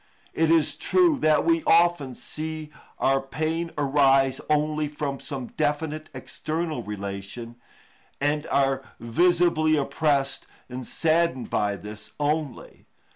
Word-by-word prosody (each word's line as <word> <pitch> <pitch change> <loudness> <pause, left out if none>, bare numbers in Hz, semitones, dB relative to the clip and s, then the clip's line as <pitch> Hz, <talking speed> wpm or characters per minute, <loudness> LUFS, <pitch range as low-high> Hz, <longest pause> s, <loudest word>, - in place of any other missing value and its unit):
It 160 -1 +2
is 165 -2 +3
true 345 -6 +3
that 155 -6 +3
we 330 -1 +2
often 170 - +3
see 155 -1 -6 0.3
our 135 0 +2
pain 160 +5 -2
arise 135 -2 +3
only 150 0 +1
from 145 -2 -4
some 135 -3 -6
definite 155 +1 -1
external 155 -3 -4
relation, 100 +3 -6 0.6
and 145 +2 0
are 135 -1 +1 0.2
visibly 165 +5 +3
oppressed 140 -1 0 0.2
and 125 0 -7
saddened 165 -4 +1
by 100 -1 +1
this 105 +1 -9
only. 145 -3 -3
150 Hz, 115 wpm, -25 LUFS, 135-160 Hz, 0.6 s, is